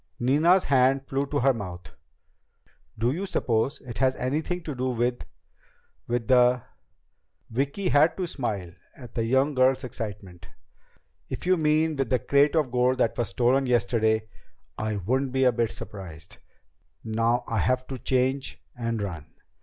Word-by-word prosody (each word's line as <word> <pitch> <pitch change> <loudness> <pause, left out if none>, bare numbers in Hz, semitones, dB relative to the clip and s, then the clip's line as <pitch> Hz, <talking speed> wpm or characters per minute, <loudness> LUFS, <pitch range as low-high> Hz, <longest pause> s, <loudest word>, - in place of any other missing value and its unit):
Nina's 155 +9 +4
hand 135 0 +2
flew 135 +1 -1
to 145 -1 -1
her 135 +1 +4
mouth. 90 -6 -8 1.0
"Do 115 +3 +1
you 185 +7 -3
suppose 120 -6 0
it 120 -4 -7
has 130 0 +2
anything 155 +7 -2
to 150 - -4
do 130 0 -2
with... 120 0 -1 0.8
with 120 -2 -2
the 125 -1 +4 0.4
..." - - -48
Vicki 140 - -1
had 150 +3 +4
to 185 - -1
smile 105 - -4 0.2
at 125 -4 -12
the 115 - -1
younger 130 +3 +1
girl's 130 +1 +3
excitement. 105 -7 -7 0.8
"If - - -6
you 185 +1 +4
mean 155 -1 +1
with 135 -4 -1
the 125 - +3
crate 140 +4 +2
of 150 -6 +1
gold 125 +1 +2
that 115 - +1
was 120 -5 -1
stolen 130 +5 +2
yesterday, 110 -3 +1 0.5
I 110 0 -2
wouldn't 130 +7 -1
be 130 0 +2
a 125 - +5
bit 115 -1 0
surprised. 95 -9 -9 0.6
Now 115 +2 0
I 115 - -1
have 130 +6 +1
to 130 -1 -7
change 130 +2 -1 0.2
and 115 -2 -2
run." 80 -6 -7
125 Hz, 160 wpm, -26 LUFS, 115-135 Hz, 1.0 s, a